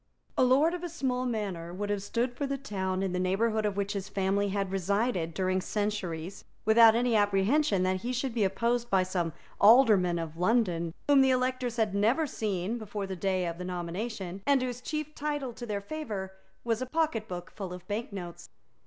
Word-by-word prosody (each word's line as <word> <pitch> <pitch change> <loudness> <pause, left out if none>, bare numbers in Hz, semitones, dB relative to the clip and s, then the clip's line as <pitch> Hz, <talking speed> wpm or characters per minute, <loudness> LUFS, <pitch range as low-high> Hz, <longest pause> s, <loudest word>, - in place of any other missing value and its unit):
A - - +3
lord 275 +7 +4
of 355 -1 -5
a 350 - -3
small 255 -5 -1
manor 195 -8 -3
would 205 +3 -3
have 205 -1 -1
stood 235 +5 -1
for 280 +3 -3
the 275 0 -2
town 190 -7 -2
in 190 - -1
the 180 - 0
neighbourhood 215 +4 +1
of 200 -1 -3
which 200 +1 -1
his 200 0 -4
family 200 +1 0
had 195 -1 -2
resided 195 -2 0
during 185 0 +1
centuries, 190 -4 -3 0.2
without 220 +1 +7
any 240 0 +2
apprehension 205 +2 +3
that 185 0 +1
he 245 - -2
should 255 0 -2
be 225 -3 +1
opposed 235 +5 0
by 190 -1 +3
some 180 -3 -1 0.3
alderman 210 -7 +6
of 165 -1 -5
London, 180 -5 +1
whom 285 -2 +6
the 265 - +4
electors 255 -1 0
had 220 -4 +1
never 225 +10 +2
seen 215 -3 -2
before 205 -2 -4
the 190 -1 -5
day 185 0 0
of 170 0 -4
nomination, 180 +2 -4
and 280 -2 +4
whose 250 -1 -4
chief 305 +1 -4
title 290 -4 -3
to 240 +1 -8
their 205 -2 -2
favour 205 -7 -5 0.3
was 230 0 0
a 255 - -2
pocketbook 225 - -2
full 195 -4 -6
of 180 0 -9
bank 215 +3 -3
notes. 175 -4 -8
205 Hz, 195 wpm, -29 LUFS, 185-245 Hz, 0.3 s, without